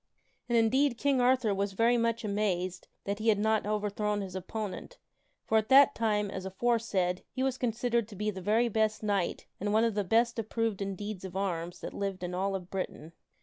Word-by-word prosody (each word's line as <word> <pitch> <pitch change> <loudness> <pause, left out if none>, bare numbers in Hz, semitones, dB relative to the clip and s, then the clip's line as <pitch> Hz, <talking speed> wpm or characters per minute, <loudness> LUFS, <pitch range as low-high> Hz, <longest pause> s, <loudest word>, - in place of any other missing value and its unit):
And 235 - +3
indeed 240 +3 +3
King 275 -1 +2
Arthur 250 -4 +3
was 195 0 -1
very 230 +4 +3
much 230 -1 0
amazed 185 -3 -1 0.2
that 200 +1 -3
he 220 - -3
had 210 - +4
not 220 0 +1
over 210 0 0
thrown 210 0 -1
his 190 -2 -6
opponent, 210 - -5 0.5
for, 220 - +3
at 215 - -5
that 275 0 +7
time, 210 -3 0
as 190 -2 -5
aforesaid, 190 -3 0
he 260 - -2
was 265 -1 -1
considered 235 -1 0
to 215 - -11
be 210 +2 -1
the 190 -2 -7
very 220 +6 +2
best 220 -1 0
knight 200 -4 -1
and 205 - -3
the - - +1
one 225 +1 +3
best 235 +3 +2
approved 225 -2 -2
in 195 -1 -2
deeds 205 -1 -6
of 190 -1 -7
arms 175 -2 -3
that - - -6
lived 195 -2 -3
in 180 0 -3
all 195 +2 -1
of 180 -1 -7
Britain. 175 -4 -5
210 Hz, 205 wpm, -30 LUFS, 195-230 Hz, 0.5 s, that